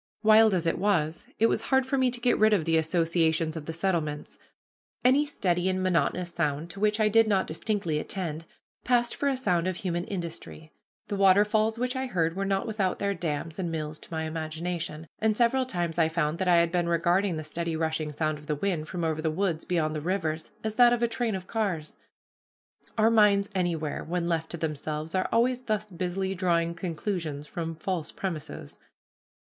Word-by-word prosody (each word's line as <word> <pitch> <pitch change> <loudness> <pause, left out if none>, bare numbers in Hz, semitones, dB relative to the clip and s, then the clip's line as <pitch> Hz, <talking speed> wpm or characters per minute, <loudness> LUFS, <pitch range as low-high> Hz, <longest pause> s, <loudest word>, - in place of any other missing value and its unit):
Wild 220 -1 +6
as 175 -2 -1
it 165 - 0
was, 170 -6 0
it 225 - +4
was - - +2
hard 265 -1 +2
for 265 - -1
me 260 -1 +3
to 245 0 -3
get 245 +1 +2
rid 215 0 +5
of 180 -7 +2
the 165 - +2
associations 165 0 +1
of 155 -2 -6
the - - -2
settlements. 165 -4 -2 0.7
Any 275 +4 +5
steady 180 -9 0
and 185 0 -1
monotonous 180 0 +1
sound, 155 0 -1
to 195 - -10
which 210 +1 +2
I 215 - +4
did 225 +1 +4
not 195 -3 +2
distinctly 165 -2 -1
attend, 165 -3 -4 0.4
passed 240 -1 +2
for 285 - 0
a 270 - 0
sound 180 -9 +1
of 185 - -1
human 175 -1 -2
industry. 170 -3 -6 0.4
The 205 -1 -3
waterfalls 210 +3 +4
which 250 +2 -1
I 260 0 -2
heard 165 -7 0
were 195 +1 -1
not 195 0 0
without 205 -5 -1
their 200 0 0
dams 165 -1 -4
and 175 -3 -2
mills 155 -1 -4
to - - -14
my 160 -1 -2
imagination; 160 0 -4
and 215 -1 +1
several 255 +2 +2
times 175 -6 -2
I 160 -1 +4
found 160 -1 -1
that 190 - 0
I 175 - +6
had 170 0 +3
been 175 -1 0
regarding 175 +2 +2
the 155 - -4
steady 165 +2 -3
rushing 160 -1 -1
sound 155 0 -1
of 150 - -15
the 150 - 0
wind 160 -1 -2
from 175 -1 -4
over 160 -1 0
the 160 - 0
woods 170 0 -1
beyond 155 -3 0
the 155 - -3
rivers 160 -2 -2
as 220 -1 -2
that 240 -1 +7
of 240 0 0
a - - +4
train 230 -2 -1
of 185 -1 -6
cars. 190 -9 -2 1.0
Our 220 +1 +4
minds 205 -3 +4
anywhere, 170 -5 -1
when 175 +1 -2
left 165 -2 -1
to 170 - -5
themselves, 155 0 -4
are 185 0 0
always 245 +2 +2
thus 215 -3 -2
busily 185 +2 -2
drawing 170 -2 +1
conclusions 165 -4 -4
from 165 +1 -5
false 165 -1 -3
premises. 170 -6 -6
175 Hz, 200 wpm, -27 LUFS, 160-210 Hz, 1.0 s, that